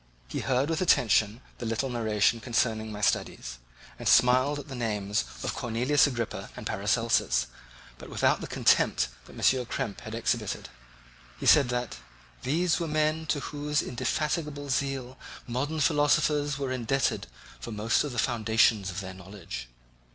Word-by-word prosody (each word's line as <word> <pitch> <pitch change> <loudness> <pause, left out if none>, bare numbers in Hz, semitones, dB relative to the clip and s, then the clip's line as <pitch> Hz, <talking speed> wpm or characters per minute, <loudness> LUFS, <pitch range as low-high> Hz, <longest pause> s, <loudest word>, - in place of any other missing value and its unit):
He - - -4
heard 130 +1 +1
with 165 +1 -1
attention 110 - +3 0.2
the - - -5
little 115 +4 -1
narration 115 -2 +1
concerning 110 -2 0
my 105 0 -6
studies 60 -10 -1 0.4
and - - -4
smiled 130 +4 +5
at 145 - -8
the 140 - -8
names 105 - -1 0.2
of - - -2
Cornelius 125 +5 +2
Agrippa 120 -5 -4
and - - -7
Paracelsus, 60 -1 +1 0.5
but - - -10
without - - +1
the - - -5
contempt 60 - +2 0.2
that - - -14
M. 130 -2 +2
Krempe 105 - -4
had 110 +1 -7
exhibited. 115 -3 -2 0.7
He - - -5
said 140 -5 +6
that 125 -1 -2 0.4
"These 165 +7 +1
were 170 - -2
men 155 +1 0
to 145 - 0
whose 150 0 -1
indefatigable 150 +3 -2
zeal 130 -1 -2 0.3
modern 140 +6 -2
philosophers 145 -1 +2
were 135 -2 -3
indebted 130 +1 0 0.3
for 115 - -7
most 110 +2 +1
of 145 - -4
the 120 - -7
foundations 110 -4 +2
of 95 +1 -4
their 95 -1 -7
knowledge. 90 -10 -8
125 Hz, 150 wpm, -28 LUFS, 110-145 Hz, 0.7 s, said